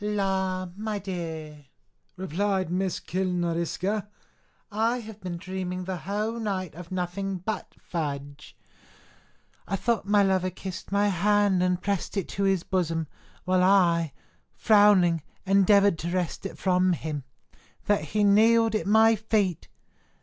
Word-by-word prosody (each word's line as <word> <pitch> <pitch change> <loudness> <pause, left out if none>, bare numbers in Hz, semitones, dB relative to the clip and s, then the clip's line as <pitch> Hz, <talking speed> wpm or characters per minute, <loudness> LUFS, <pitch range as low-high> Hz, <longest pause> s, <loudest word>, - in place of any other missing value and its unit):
"La! 190 -3 -1
my 215 +1 -3
dear," 160 -6 -6 0.5
replied 190 0 -1
Miss 185 0 -1
Killnariska, 180 +3 -2 0.6
"I 225 +4 +1
have 220 -2 -10
been 180 -2 -5
dreaming 185 0 -4
the 185 0 -4
whole 210 +6 -3
night 190 -6 -3
of 170 +2 -11
nothing 185 +2 -3
but 210 +5 -5
fudge; 145 -3 -6 1.1
I 195 - -1
thought 225 +1 -1
my 205 0 +4
lover 190 -1 +1
kissed 185 +1 -8
my 205 +1 +2
hand, 200 0 +2
and 180 -1 +1
pressed 200 +1 -2
it 195 - -1
to 200 - -1
his 190 -3 +2
bosom, 165 -3 -1 0.4
while 185 0 +2
I, 170 -5 +3 0.4
frowning, 200 -6 +4 0.2
endeavoured 195 -1 +4
to 170 - -3
wrest 180 +1 -2
it - - -12
from 185 -1 +2
him: 155 -3 -4 0.6
that 205 -1 +2
he 210 -1 0
kneeled 225 +2 +5
at 215 - -1
my 220 +2 +5
feet. 210 -5 -1
190 Hz, 135 wpm, -26 LUFS, 175-205 Hz, 1.1 s, kneeled